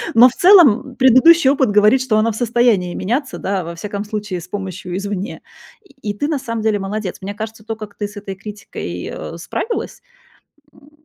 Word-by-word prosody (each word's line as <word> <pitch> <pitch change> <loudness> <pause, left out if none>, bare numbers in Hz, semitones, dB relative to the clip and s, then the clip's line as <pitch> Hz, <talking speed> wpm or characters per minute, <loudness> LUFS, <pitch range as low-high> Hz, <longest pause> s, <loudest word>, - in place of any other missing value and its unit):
но 240 +3 +8
в 245 - -11
целом, 360 -5 +7 0.2
м, - - -15
предыдущий 265 +4 +6
опыт 270 -4 +2
говорит, 210 +5 +4
что 245 -4 +1
она 220 +1 +2
в 215 - -7
состоянии 235 -7 +1
меняться, 255 +7 -2
да, 195 -1 -2
во 170 +1 -7
всяком 200 +3 -5
случае 210 -3 -4
с 175 - -11
помощью 185 -2 -6
извне, 200 +1 -5 0.4
и 390 - -22 0.2
и - - -19
ты 290 - -1
на 300 -3 -1
самом 230 -4 -4
деле 215 -1 +1
молодец. 195 -1 -4
Мне 200 +2 -5
кажется, 220 0 -8
то, 225 - -4
как 215 -2 -10
ты 205 - -3
с 205 - -15
этой 195 -1 -7
критикой, 205 +1 -7
а, - - -7
справилась, 455 0 -4 0.7
м, 285 - -21
215 Hz, 200 wpm, -18 LUFS, 200-255 Hz, 0.7 s, но